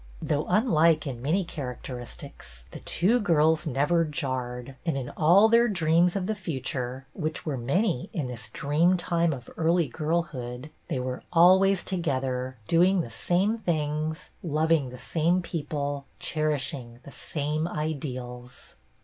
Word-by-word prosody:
Though 150 0 -1
unlike 165 -6 +3
in 125 -4 -5
many 165 +9 +1
characteristics, 125 - -8
the - - -8
two 215 +9 +2
girls 160 -5 +3
never 150 +5 +2
jarred, 130 -3 -4
and, 165 -5 -1
in 125 -2 -4
all 180 +7 +5
their 235 +1 +5
dreams 175 -2 +3
of 195 -2 -1
the 220 - 0
future 130 - -4
— - - -38
which 155 -3 -3
were 150 -4 -1
many, 135 - 0
in 155 - -2
this 120 -3 -7
dream 155 +9 +2
time 170 -1 +1
of 125 -5 -6
early 165 0 +2
girlhood 150 -3 -3
— - - -39
they - - -2
were 125 0 -3
always 185 +2 +5
together, 130 -7 -2
doing 180 +2 +4
the 120 - -7
same 190 - +1
things, 155 -2 -2
loving 155 -3 +1
the 125 - -9
same 170 +7 +1
peo 165 -4 -4
ple, 145 -2 -2
cherishing 145 -5 -2
the 140 - -11
same 150 +2 -2
ideals. 130 -6 -5
155 Hz, 150 wpm, -27 LUFS, 130-170 Hz, -, all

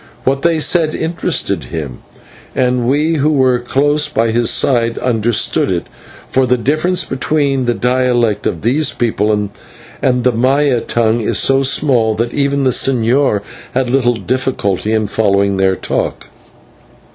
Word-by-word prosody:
What 135 +1 0
they 165 0 +1
said 155 -1 +1
interested 165 +1 -2
him, 75 -6 -6 0.6
and 125 -1 0
we 150 +5 +1
who 150 +2 +1
were 130 -4 +2
close 145 +4 +1
by 115 0 0
his 115 0 +1
side 115 -3 +1
understood 115 -4 0
it, 85 -2 -2 0.4
for 130 -1 +1
the 125 - +2
difference 155 +9 0
between 135 0 -1
the 120 -1 0
dialect 120 -1 0
of 85 - -4
these 135 +6 +1
people 110 -3 -1
and 105 +4 -3
the 125 - +3
Maya 130 +2 +1
tongue 115 0 0
is 105 - 0
so 135 0 +3
small 130 -5 +2
that 115 +2 -2
even 140 0 0
the 130 - +2
señor 125 -2 +1 0.3
had 130 -1 0
little 125 -2 +2
difficulty 115 -5 -2
in 110 -1 +1
following 100 -2 +1
their 95 0 +2
talk. - - -4
125 Hz, 145 wpm, -15 LUFS, 110-135 Hz, 0.6 s, the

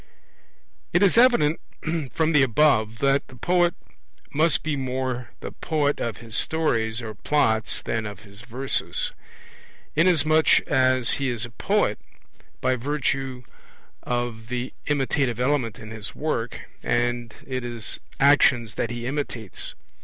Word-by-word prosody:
It 175 +4 +4
is 195 - +4
evident 230 -11 +5 0.5
from 160 +4 +1
the 150 -3 +5
above 115 -4 +3
that, 140 0 +2
the 130 - -14
poet 175 +5 +2 0.6
must 155 +2 +2
be 155 -2 -1
more 130 -2 -3
the - - -6
poet 150 -3 -1
of 115 -4 -3
his 115 -1 -8
stories 120 -7 0
or 110 -1 -5
Plots 110 -2 +1
than 110 -1 -2
of 105 -1 -9
his 100 0 -13
verses, 130 +3 -1 0.8
inasmuch 155 -2 +5
as 130 -2 +3
he 135 - +1
is 120 -2 -2
a 120 - -11
poet 195 - 0 0.6
by 130 0 +2
virtue 135 -1 -2 0.6
of 120 -2 -3
the 125 +1 -4
imitative 135 -3 0
element 125 -4 0
in 110 0 -10
his 110 -2 -6
work, 120 -6 -2 0.2
and 120 -1 -1
it 130 -2 -3
is 120 -3 -5 0.2
actions 130 -5 +4
that - - -2
he 120 0 -5
imitates. 125 -6 -4
130 Hz, 135 wpm, -24 LUFS, 115-145 Hz, 0.8 s, evident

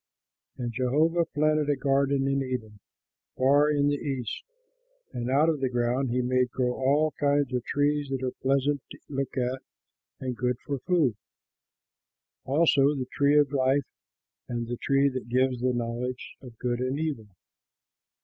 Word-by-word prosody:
And 120 -2 -3
Jehovah 155 +8 +2
planted 155 -1 +1
a 145 - +3
garden 135 0 +1
in 135 0 +1
Eden, 120 -5 -5 0.6
far 140 +3 +4
in 145 -1 +2
the 145 0 +1
East; 130 -6 -4 0.7
and 120 +1 -3
out 145 +4 +4
of 160 -3 +1
the 130 -1 0
ground 125 +2 0
he 125 +1 0
made 125 0 +1
grow 125 0 -1
all 145 +4 +2
kinds 145 -2 +1
of 125 -2 -1
trees 145 0 0
that 135 -1 -3
are 130 - -1
pleasant 140 +1 +1
to - - -10
look 135 -1 -3
at 130 +1 -1 0.6
and 130 -2 -3
good 125 0 -1
for 140 -2 -3
food, 155 -4 +2 1.3
also 145 0 +3
the 130 -2 -3
tree 145 +1 +3
of 145 -2 +4
life 135 0 +2 0.6
and 120 -1 -2
the 120 0 -4
tree 140 +2 +2
that 130 -3 -4
gives 130 0 +1
the 130 0 +2
knowledge 120 +1 -4
of 125 -4 -12
good 120 0 -2
and 130 +2 -1
evil. 150 -9 -3
135 Hz, 160 wpm, -27 LUFS, 125-145 Hz, 1.3 s, far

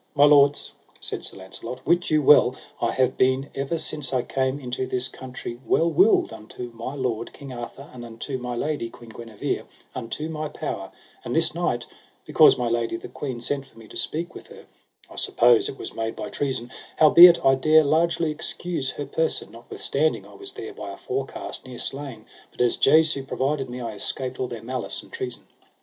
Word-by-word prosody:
My 145 0 +7
lords, 145 -1 +5 0.3
said - - -3
Sir - - -8
Launcelot, 95 +7 -8
wit 175 +1 +2
you 155 -1 +3
well, 130 -3 +6 0.3
I - - +2
have 130 0 +1
been 130 +2 +2
ever 135 +5 -2
since 150 -3 -3
I 130 -2 +1
came 130 +1 -1
into 130 -1 -3
this 125 0 -1
country 125 -2 -8
well 165 +4 +2
willed 380 -2 +4
unto 120 +3 -8
my 115 +4 -6
lord, 120 -4 -2
King 140 -2 -9
Arthur, 120 +3 -8
and 125 -1 -9
unto 120 +3 -5
my 125 0 -4
lady, 145 -2 -2
Queen 115 -1 -13
Guenever, 115 -2 -4 0.3
unto 125 +6 -4
my 155 -1 -4
power; 100 -11 -5 0.3
and - - -3
this - - +2
night - - -1 0.4
because - - +6
my 125 - -1
lady 115 -1 0
the - - -9
queen 130 -4 -5
sent 140 +2 -3
for 115 - -23
me 110 -1 -13
to - - -12
speak 170 +3 -3
with - - -11
her, - - -14 0.4
I - - -14
suppose 120 -1 +4
it 135 - -7
was - - -7
made 115 0 -3
by - - -5
treason, 130 -4 -3 0.3
howbeit 170 +3 +9
I 135 - +7
dare 155 +4 +5
largely 160 +2 +2
excuse 160 -1 -3
her 145 - -5
person, 160 -4 -1
notwithstanding 135 +6 -1
I - - -15
was 390 -1 -8
there 415 +1 -7
by - - -7
a - - -8
forecast 405 - -5
near 125 -1 -8
slain, 135 -6 -5 0.2
but - - -23
as 120 -1 +3
Jesu 155 -1 +4
provided 135 0 -1
me 125 +1 -6
I 115 -2 -4
escaped 130 +4 -3
all 130 - -1
their 115 -2 -7
malice 125 +1 -3
and - - -18
treason. 125 -2 -5
130 Hz, 195 wpm, -24 LUFS, 120-150 Hz, 0.4 s, howbeit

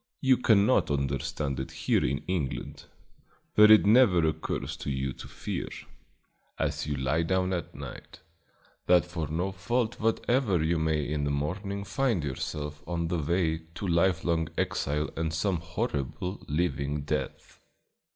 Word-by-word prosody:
You 130 -2 +4
cannot 105 -4 +4
understand 70 0 -1
it 65 - -4
here - - +1
in 70 +2 -1
England, 85 -8 -3 0.7
where 105 0 +8
it 110 - +8
never 100 -7 +5
occurs 80 0 -3
to - - -5
you 65 -1 -2
to - - -10
fear, - - -5 0.9
as - - -1
you 75 - -1
lie 70 +4 +1
down 95 +2 +1
at 85 -3 -4
night, - - -9 0.7
that 90 -1 +5
for 85 -3 -4
no 85 +6 -1
fault 110 +5 -1
whatever 115 - +1
you 80 +1 +1
may 80 -2 0
in 75 -1 -1
the 70 - 0
morning 95 +8 -2
find 115 - 0
yourself 75 +2 -4
on 85 -1 -2
the 85 - 0
way 80 +1 +1 0.2
to 100 - -4
lifelong 85 -2 +2
exile 75 +2 -1
and 80 -1 -2
some 90 +2 +1
horrible, 80 +3 -3
living 75 -2 -1
death. 70 - -4
85 Hz, 145 wpm, -28 LUFS, 75-95 Hz, 0.9 s, where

